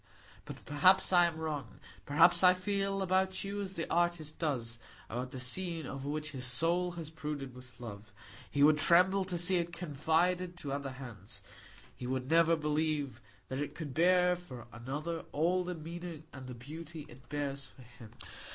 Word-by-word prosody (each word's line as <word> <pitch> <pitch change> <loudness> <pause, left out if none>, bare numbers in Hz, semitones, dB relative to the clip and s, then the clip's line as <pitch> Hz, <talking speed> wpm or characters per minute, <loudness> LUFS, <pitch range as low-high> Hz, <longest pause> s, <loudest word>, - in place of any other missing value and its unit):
But - - -9
perhaps 185 +7 +5
I 175 -1 +7
am 165 -2 -5
wrong; 155 -3 -4 0.3
perhaps 170 +5 +5
I 180 0 +8
feel 195 +1 -1
about 190 0 +1
you 200 +1 -3
as 190 -1 -5
the 165 - -2
artist 170 -3 0
does 120 -8 -1 0.3
about 125 +3 -4
the 130 - -6
scene 165 +5 -1
over 135 +1 -5
which 155 +1 -3
his 130 -3 -5
soul 165 +8 +2
has 165 -3 -6
brooded 150 -4 -5
with 125 -1 -13
love; 105 -3 -9 0.4
he 145 - +2
would 150 +1 +6
tremble 180 +5 +5
to 180 -2 -2
see 180 +2 +3
it 170 0 -1
confided 175 +3 0
to 145 -5 -5
other 140 -1 -3
hands; 120 -7 -9 0.5
he 125 - -6
would 130 +2 -2
never 165 0 +5
believe 150 -2 -1 0.3
that 130 - -4
it 145 0 -4
could 150 -5 -6
bear 180 +2 +4
for 170 -9 -10
another 145 +8 -4
all 175 +5 +2
the 180 0 -4
meaning 165 0 -7
and 130 -2 -9
the 125 - -7
beauty 155 +5 -8
it 125 +1 -16
bears 140 -1 -2
for 130 - -16
him. 120 -2 -14
155 Hz, 180 wpm, -33 LUFS, 135-175 Hz, 0.5 s, I